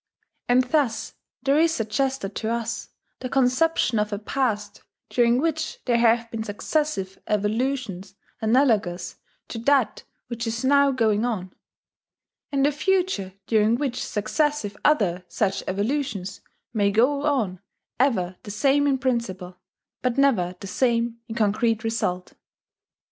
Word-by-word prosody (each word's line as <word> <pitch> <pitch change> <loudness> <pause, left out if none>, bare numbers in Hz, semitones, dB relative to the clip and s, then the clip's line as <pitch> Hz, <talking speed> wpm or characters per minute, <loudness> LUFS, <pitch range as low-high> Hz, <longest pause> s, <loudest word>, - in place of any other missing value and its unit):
And 250 +1 +5
thus 255 -3 0 0.3
there 280 +2 +3
is 325 0 +3
suggested 225 -1 -1
to 220 - -2
us 235 0 -3 0.3
the 255 - -5
conception 255 -1 +2
of 210 0 -1
a 205 - -1
past 210 -2 -2 0.3
during 240 0 +3
which 315 +1 -1
there 240 -2 +2
have 230 0 +3
been 225 - -3
successive 205 -2 -2
Evolutions 210 -2 -1 0.3
analogous 215 -7 +1 0.3
to 230 - -5
that 255 -2 +2 0.2
which 230 -1 -4
is 230 +3 -2
now 280 +1 +5
going 225 -5 +1
on; 195 -7 -3 1.0
and 275 -1 +2
a 290 - +3
future 350 - 0
during 220 +1 +3
which 255 -1 -2
successive 215 0 -1
other 190 - +2
such 195 -3 -1
Evolutions 205 -1 -2 0.3
may 205 -3 +2
go 250 +8 +2
on 230 - 0 0.4
ever 185 -9 +1
the - - -10
same 275 +7 +2
in 275 -1 +2
principle, 200 -9 -2 0.4
but 250 0 0
never 210 -11 +2
the - - -6
same 235 +2 0
in 225 - -6
concrete 225 +1 +1
result." 195 -5 -2
230 Hz, 130 wpm, -24 LUFS, 205-270 Hz, 1.0 s, And